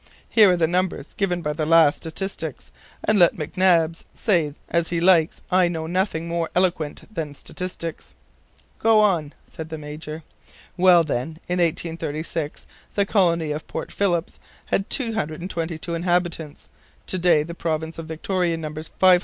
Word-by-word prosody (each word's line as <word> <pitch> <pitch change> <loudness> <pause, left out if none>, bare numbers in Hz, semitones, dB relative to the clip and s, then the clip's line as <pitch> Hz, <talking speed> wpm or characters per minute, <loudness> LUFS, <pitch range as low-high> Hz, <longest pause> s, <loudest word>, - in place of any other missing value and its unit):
"Here 215 -4 +6
are 180 - +3
the 165 - +3
numbers 180 +2 -1
given 180 -4 -1
by 150 -1 -1
the 155 +1 -2
last 160 -2 +5
statistics; 190 +4 -4 0.3
and 215 -1 +3
let 175 -2 +6
McNabbs 165 0 +2
say 165 -9 +1
as 170 -1 0
he 170 - 0
likes, 170 -2 +3
I 180 -1 +5
know 165 -2 -3
nothing 175 -1 -1
more 170 -1 -1
eloquent 175 -5 0
than 155 -5 -4
statistics." 170 0 -6 0.6
"Go 225 -1 +5
on," 175 -8 +2
said 160 -1 -8
the 160 - -5
Major. 155 +1 -7 0.5
"Well, 180 -2 +6
then, 155 +1 -3
in 180 0 -1
1836, 160 -2 -2 0.3
the 200 - +3
colony 170 -6 +2
of 150 +1 -5
Port - - -5
Phillip 175 -4 0 0.3
had 195 - -1
224 170 - -2
inhabitants. 170 -3 -1 0.4
To 185 - -1
day 170 -4 +4
the 170 +2 -7
province 160 -1 -3
of 165 - -7
Victoria 170 +1 -1
numbers 155 0 -6
550,000. 185 -1 +5
170 Hz, 150 wpm, -23 LUFS, 160-180 Hz, 0.6 s, Here